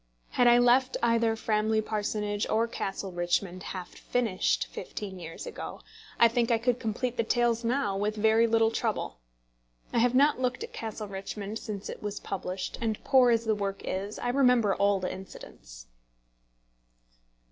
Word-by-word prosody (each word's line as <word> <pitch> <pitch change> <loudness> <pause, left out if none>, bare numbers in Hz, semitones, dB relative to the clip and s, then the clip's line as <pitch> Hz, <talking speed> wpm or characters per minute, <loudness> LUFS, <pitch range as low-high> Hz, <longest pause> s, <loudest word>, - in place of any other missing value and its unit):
Had 245 - +3
I 240 0 +7
left 245 +2 +4
either 230 -1 +3
Framley 220 0 +1
Parsonage 210 -1 -2
or 225 +2 +2
Castle 195 -3 -4
Richmond 175 +1 -1
half 185 -2 -6
finished 225 -7 0
fifteen 195 -3 -7
years 165 -1 -8
ago, - - -7 0.4
I 235 - +8
think 230 0 0
I 230 - +4
could 245 +2 0
complete 240 +2 -2
the 230 - +2
tales 235 0 +1
now 230 -4 0
with 210 +2 -1
very 220 +2 +4
little 225 0 +3
trouble. 220 - -2 0.7
I - - +3
have 245 +1 +3
not 285 +1 +4
looked 255 - -1
at 465 0 -8
Castle 220 -1 -5
Richmond 200 +2 -5
since 205 -3 -6
it - - -7
was 205 0 -4
published; 185 -1 -5
and 220 -2 -2
poor 260 -3 +5
as 230 -1 +2
the 220 - +2
work 200 -1 -3
is, 195 +3 -3
I - - -2
remember 250 -5 +4
all 200 0 +2
the 185 - -3
incidents. - - -11
220 Hz, 165 wpm, -28 LUFS, 200-240 Hz, 0.7 s, I